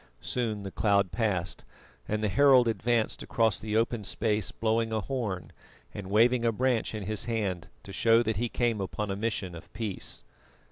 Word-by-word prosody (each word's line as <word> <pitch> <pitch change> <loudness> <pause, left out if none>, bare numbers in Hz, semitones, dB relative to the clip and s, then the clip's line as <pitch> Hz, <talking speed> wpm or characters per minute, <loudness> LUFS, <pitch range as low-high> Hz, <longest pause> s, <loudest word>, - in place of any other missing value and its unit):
Soon 110 -5 -2
the 95 - -6
cloud 100 -2 +2
passed, 95 -4 -1 0.4
and 110 0 -1
the - - +3
herald 130 +1 +5
advanced 115 +1 0
across 115 -3 +1
the 110 0 -1
open 115 -1 0
space 105 0 0
blowing 115 0 0
a 110 -1 0
horn, 105 -7 -3 0.4
and 95 -2 -7
waving 120 +4 +4
a 115 - +3
branch 120 0 0
in 105 - -4
his 110 +2 -2
hand 100 -7 -2 0.2
to 95 - -9
show 115 +4 +4
that 110 -2 -1
he 120 +2 -1
came 115 -4 0
upon 100 +2 -3
a - - -1
mission 100 -4 -2
of 85 - -11
peace. 110 -4 -4
110 Hz, 180 wpm, -29 LUFS, 100-115 Hz, 0.4 s, herald